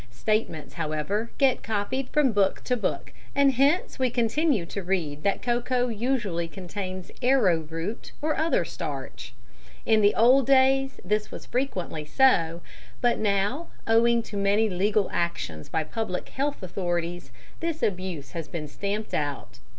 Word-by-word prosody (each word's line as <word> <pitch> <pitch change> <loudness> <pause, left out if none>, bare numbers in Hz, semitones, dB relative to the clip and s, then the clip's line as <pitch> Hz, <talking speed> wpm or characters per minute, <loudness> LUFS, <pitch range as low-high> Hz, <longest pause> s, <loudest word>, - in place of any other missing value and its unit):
Statements, 160 - -2
however, 165 +8 -2
get 270 -2 +3
copied 225 +5 -2
from 295 -4 +3
book 200 -2 +1
to 250 - +1
book, 235 - -3 0.2
and 280 -1 +5
hence 280 +6 +2
we 260 -1 +2
continue 240 - +1
to 200 +4 -5
read 170 -6 -2
that 200 +3 0
cocoa 245 +1 +1
usually 215 -7 -1
contains 185 +1 -6
arrowroot 180 - +1
or 305 +1 0
other 315 - +1
starch. 135 -7 -6 0.5
In 220 -1 +4
the 205 0 +4
old 250 +3 +5
days 270 0 +4
this 210 +3 0
was - - -9
frequently 195 - -2
so, 170 - +3 0.4
but 240 -1 +2
now, 210 +9 0 0.2
owing 230 +1 +4
to 210 - -7
many 200 +2 +3
legal 200 +3 +2
actions 170 - -2
by 160 - 0
Public 185 +2 -4
Health 280 -4 -2
Authorities, 175 -4 -3 0.3
this 330 -1 -3
abuse 180 -7 -2
has 165 -2 -5
been 160 -3 -5
stamped 205 +7 -4
out. 140 -5 -3
205 Hz, 145 wpm, -26 LUFS, 170-250 Hz, 0.5 s, and